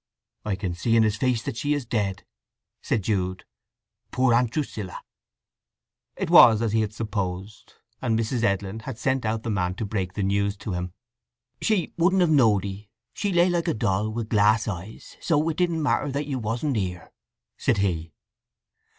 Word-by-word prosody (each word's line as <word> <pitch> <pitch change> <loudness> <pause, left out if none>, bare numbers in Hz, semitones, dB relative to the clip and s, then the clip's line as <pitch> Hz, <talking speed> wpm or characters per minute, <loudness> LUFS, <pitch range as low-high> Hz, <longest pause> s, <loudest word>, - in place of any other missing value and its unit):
"I 105 -2 -1
can 95 -2 -3
see 115 +6 0
in 115 - +5
his 105 -1 +1
face 120 0 0
that 140 - -4
she 145 +4 0
is 145 -4 -3
dead," 100 -5 -2 0.6
said 105 - -1
Jude. 95 -3 -1 0.6
"Poor 130 -1 +2
Aunt 120 0 +3
Drusilla!" 110 -8 -4 1.1
It - - -3
was 110 0 +8
as 115 - 0
he 110 - +3
had 105 -1 -2
supposed, 105 -2 -5 0.3
and 115 -3 +1
Mrs. 115 +2 -1
Edlin 100 -1 0
had 115 +1 -7
sent 130 -1 0
out 110 0 -1
the 115 - -2
man 90 -2 -1
to 110 - -3
break 95 -3 -3
the 100 - -2
news 100 +1 0
to 100 - -6
him. 90 0 -3 0.7
"She 200 -8 0
wouldn't 185 +3 +4
have 170 -3 +3
knowed 110 -9 +4
'ee. 100 +1 -7 0.2
She 205 - -2
lay 175 0 +4
like 175 -2 0
a - - +1
doll 105 -1 0
wi' 115 +2 -3
glass 110 0 +3
eyes; 100 +1 -7
so 160 -2 +1
it 160 - -3
didn't 170 -3 +1
matter 145 0 +1
that 140 +2 -2
you 135 -3 -3
wasn't 120 +4 -1
here," 90 -4 -4 0.4
said - - +1
he. 85 -5 -1
110 Hz, 185 wpm, -25 LUFS, 100-130 Hz, 1.1 s, was